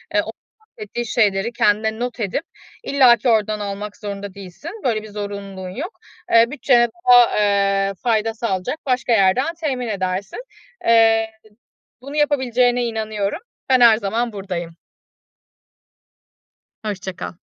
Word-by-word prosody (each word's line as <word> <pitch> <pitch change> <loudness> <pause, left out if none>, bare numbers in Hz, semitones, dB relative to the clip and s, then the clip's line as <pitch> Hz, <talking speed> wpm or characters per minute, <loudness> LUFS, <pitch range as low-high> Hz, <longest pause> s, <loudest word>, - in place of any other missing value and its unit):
ııı, - - +3
o - - -6 0.3
bahsettiği 430 - -7
şeyleri 215 -1 +1
kendine 220 0 +1
not 245 0 -4
edip 215 - -2 0.4
illaki 250 -3 +4
oradan 215 -1 +1
almak 205 +1 -5
zorunda 200 -2 -6
değilsin. 200 - -9
Böyle 220 -4 0
bir 215 - -10
zorunluluğun 200 -2 -6
yok. 310 - -7 0.3
Iıı, 230 +1 +6
bütçene 245 -4 +3 0.2
daha, 245 -1 +7 0.5
ııı, 195 - -3
fayda 225 +1 0
sağlayacak 215 +2 -3
başka 250 -2 0
yerden 225 - +3
temin 255 -6 -2
edersin. 190 -1 -3 0.5
Iıı, 225 -1 +5 0.8
bunu 280 +3 -8
yapabileceğine 250 -4 +2
inanıyorum. 220 +1 -3 0.3
Ben 255 -1 +5
her 225 -2 +7
zaman 230 +2 -2
buradayım. 180 -4 -5 2.1
Hoşça 195 -3 -5
kal. - - -6
220 Hz, 125 wpm, -20 LUFS, 200-245 Hz, 2.1 s, daha